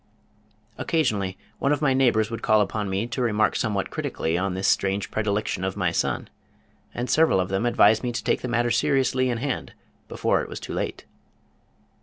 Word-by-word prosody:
Occasionally 105 Hz, -, 0 dB, 0.2 s
one 140 Hz, -, +1 dB
of 150 Hz, -, +2 dB
my 135 Hz, -3 st, +3 dB
neighbors 120 Hz, -4 st, +2 dB
would 115 Hz, -, -4 dB
call 110 Hz, 0 st, +4 dB
upon 105 Hz, 0 st, -2 dB
me 95 Hz, +3 st, -1 dB
to 120 Hz, +2 st, -4 dB
remark 110 Hz, -3 st, +2 dB
somewhat 105 Hz, -5 st, -1 dB
critically 80 Hz, +1 st, -2 dB
on 95 Hz, +1 st, -1 dB
this 95 Hz, +1 st, -1 dB
strange 95 Hz, +1 st, +1 dB
predilection 105 Hz, -3 st, -1 dB
of 95 Hz, +1 st, -2 dB
my 90 Hz, -3 st, +1 dB
son, -, -, -1 dB, 0.6 s
and 120 Hz, +1 st, -4 dB
several 155 Hz, -6 st, +3 dB
of 90 Hz, 0 st, -1 dB
them 95 Hz, +5 st, 0 dB
advised 110 Hz, -2 st, +4 dB
me 125 Hz, -, -2 dB
to 120 Hz, -2 st, -4 dB
take 120 Hz, -, +1 dB
the -, -, -3 dB
matter 120 Hz, 0 st, +1 dB
seriously 130 Hz, +1 st, +2 dB
in 120 Hz, -, -1 dB
hand 130 Hz, +2 st, -3 dB, 0.3 s
before -, -, 0 dB
it -, -, -7 dB
was -, -, -6 dB
too -, -, -7 dB
late. -, -, -4 dB
110 Hz, 190 wpm, -24 LUFS, 95-125 Hz, 0.6 s, call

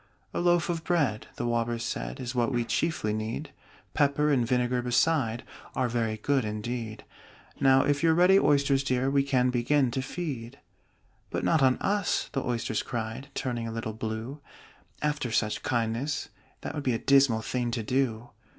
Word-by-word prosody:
"A -, -, -1 dB
loaf 175 Hz, -1 st, +3 dB
of 165 Hz, -2 st, -2 dB
bread," 140 Hz, -, 0 dB
the 120 Hz, -, -3 dB
Walrus 120 Hz, 0 st, -1 dB
said, -, -, -4 dB
"Is 120 Hz, 0 st, -4 dB
what 120 Hz, 0 st, +1 dB
we 120 Hz, -2 st, 0 dB
chiefly 135 Hz, -7 st, 0 dB
need: 110 Hz, +7 st, -4 dB, 0.4 s
Pepper 150 Hz, 0 st, +2 dB
and 125 Hz, -5 st, +2 dB
vinegar 125 Hz, 0 st, +1 dB
beside 120 Hz, -1 st, +1 dB, 0.3 s
Are 130 Hz, -2 st, +1 dB
very 115 Hz, -2 st, -1 dB
good 135 Hz, +4 st, +1 dB
indeed 110 Hz, +1 st, -4 dB, 0.5 s
Now 135 Hz, -1 st, +5 dB
if 145 Hz, 0 st, +1 dB
you're 160 Hz, -1 st, +4 dB
ready, 180 Hz, +3 st, +6 dB
Oysters 140 Hz, -3 st, +3 dB
dear, 130 Hz, 0 st, +1 dB
We 140 Hz, 0 st, +4 dB
can 130 Hz, -2 st, +2 dB
begin 125 Hz, +2 st, +2 dB
to 130 Hz, -, -1 dB
feed." 130 Hz, -5 st, -5 dB, 0.7 s
"But -, -, -3 dB
not 160 Hz, -3 st, +3 dB
on 130 Hz, -1 st, +4 dB
us!" 200 Hz, -2 st, 0 dB
the 135 Hz, -, -1 dB
Oysters 115 Hz, -2 st, -1 dB
cried, 120 Hz, +3 st, -5 dB
Turning 120 Hz, -3 st, -2 dB
a -, -, -4 dB
little 110 Hz, -1 st, -4 dB
blue. 110 Hz, +6 st, -5 dB, 0.6 s
"After 150 Hz, -5 st, -1 dB
such 110 Hz, -1 st, 0 dB
kindness, 120 Hz, +5 st, -1 dB, 0.3 s
that -, -, -5 dB
would 150 Hz, -, -3 dB
be 130 Hz, -, +1 dB
A -, -, +1 dB
dismal 135 Hz, -4 st, +4 dB
thing 125 Hz, 0 st, -1 dB
to 115 Hz, -1 st, -2 dB
do!" 120 Hz, -1 st, -1 dB
125 Hz, 170 wpm, -28 LUFS, 115-140 Hz, 0.7 s, ready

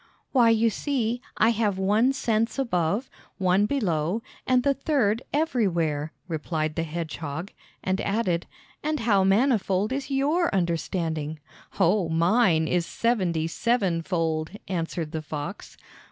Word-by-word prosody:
"Why, 240 Hz, -4 st, +5 dB
you 225 Hz, 0 st, +3 dB
see, 245 Hz, -1 st, -1 dB, 0.2 s
I 220 Hz, -, +5 dB
have 215 Hz, -4 st, +1 dB
one 210 Hz, +7 st, +3 dB
sense 230 Hz, -3 st, 0 dB
above, 210 Hz, -2 st, 0 dB, 0.3 s
one 190 Hz, +2 st, +3 dB
below, 195 Hz, -, 0 dB, 0.2 s
and 255 Hz, -1 st, +3 dB
the 280 Hz, -, +3 dB
third 260 Hz, -6 st, +1 dB
everywhere," 170 Hz, -, 0 dB, 0.2 s
replied 155 Hz, -1 st, -2 dB
the 165 Hz, -, -1 dB
hedgehog; 160 Hz, 0 st, -5 dB, 0.3 s
and 190 Hz, +1 st, 0 dB
added: 195 Hz, -5 st, 0 dB, 0.3 s
"And 305 Hz, 0 st, -1 dB
how 205 Hz, -4 st, +3 dB
manifold 205 Hz, 0 st, +2 dB
is 275 Hz, 0 st, -3 dB
your 295 Hz, +6 st, +2 dB
understanding?" 165 Hz, -3 st, -1 dB, 0.4 s
"Oh, 180 Hz, 0 st, +3 dB
mine 170 Hz, 0 st, +3 dB
is 175 Hz, 0 st, 0 dB
seventy 185 Hz, -9 st, 0 dB
sevenfold," 165 Hz, -5 st, 0 dB, 0.2 s
answered 165 Hz, -3 st, -3 dB
the 160 Hz, -, -3 dB
fox. 150 Hz, +5 st, -6 dB
195 Hz, 125 wpm, -26 LUFS, 165-235 Hz, 0.4 s, Why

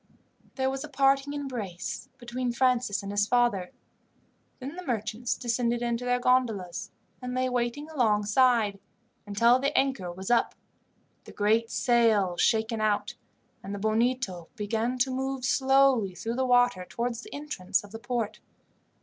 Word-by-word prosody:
There 265 Hz, -1 st, 0 dB
was 270 Hz, 0 st, -4 dB
a 305 Hz, -, -8 dB
parting 275 Hz, 0 st, +2 dB
embrace 245 Hz, -11 st, -5 dB
between 245 Hz, 0 st, -3 dB
Francis 250 Hz, -5 st, +1 dB
and 200 Hz, -, -5 dB
his 205 Hz, 0 st, +1 dB
father. 235 Hz, -7 st, +1 dB, 0.9 s
Then 275 Hz, +4 st, -7 dB
the 365 Hz, -, -7 dB
merchants 225 Hz, -, -2 dB
descended 240 Hz, 0 st, -1 dB
into 235 Hz, +1 st, -1 dB
their 245 Hz, 0 st, +1 dB
gondolas, 205 Hz, -8 st, 0 dB, 0.3 s
and 250 Hz, 0 st, -4 dB
lay 255 Hz, 0 st, +1 dB
waiting 250 Hz, +4 st, -2 dB
alongside 220 Hz, -4 st, +2 dB, 0.5 s
until 235 Hz, +5 st, +4 dB
the 280 Hz, +2 st, 0 dB
anchor 265 Hz, -10 st, 0 dB
was 190 Hz, +5 st, -5 dB
up, 240 Hz, -, +2 dB, 0.7 s
the -, -, -11 dB
great 220 Hz, +2 st, +1 dB
sails 225 Hz, -8 st, +2 dB
shaken 220 Hz, 0 st, +1 dB
out, 205 Hz, -1 st, 0 dB, 0.5 s
and 200 Hz, +1 st, -6 dB
the -, -, -6 dB
Bonito 220 Hz, -4 st, 0 dB
began 225 Hz, +3 st, -1 dB
to 255 Hz, +1 st, +1 dB
move 265 Hz, 0 st, -2 dB
slowly 265 Hz, -7 st, +3 dB
through 225 Hz, +5 st, -4 dB
the 260 Hz, +1 st, 0 dB
water 245 Hz, -6 st, +3 dB
towards 235 Hz, +4 st, -3 dB
the -, -, -12 dB
entrance 285 Hz, -13 st, -2 dB
of 205 Hz, -, -13 dB
the 225 Hz, -, -7 dB
port. 225 Hz, -3 st, -3 dB
240 Hz, 150 wpm, -28 LUFS, 210-255 Hz, 0.9 s, until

